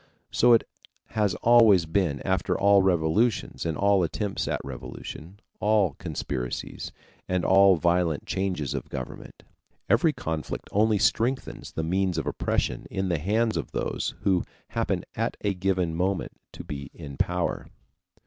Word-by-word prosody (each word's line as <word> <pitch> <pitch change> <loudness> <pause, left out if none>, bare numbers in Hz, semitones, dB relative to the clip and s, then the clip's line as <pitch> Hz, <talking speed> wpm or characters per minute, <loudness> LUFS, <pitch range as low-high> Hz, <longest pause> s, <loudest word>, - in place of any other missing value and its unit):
So 120 0 +5
it 115 - +3 0.4
has 105 -4 0
always 115 -7 +6
been 80 -4 0
after 95 0 0
all 100 0 +5
revolutions 95 +3 +1
and 80 -3 -2
all 100 -1 +3
attempts 95 +4 -2
at - - -1
revolution, 75 +7 -8 0.2
all 105 -6 +2
conspiracies, 60 -3 -4 0.4
and 90 -1 0
all 95 0 +6
violent 85 -2 +1
changes 90 -7 -2
of - - -5
government. 65 - -8 0.4
Every - - +4
conflict 80 -2 -5
only 110 +1 +3
strengthens 125 +6 0
the 80 - -2
means 95 +2 0
of - - -1
oppression - - -1
in 95 0 -2
the 85 -3 0
hands 110 +7 +1
of - - -4
those - - -2
who 95 -3 +2 0.3
happen - - -1
at - - -2
a 100 - 0
given 90 -2 0
moment 90 +3 -1 0.2
to - - -8
be 70 -1 -6
in 70 -4 -8
power. - - -1
95 Hz, 145 wpm, -26 LUFS, 80-100 Hz, 0.4 s, always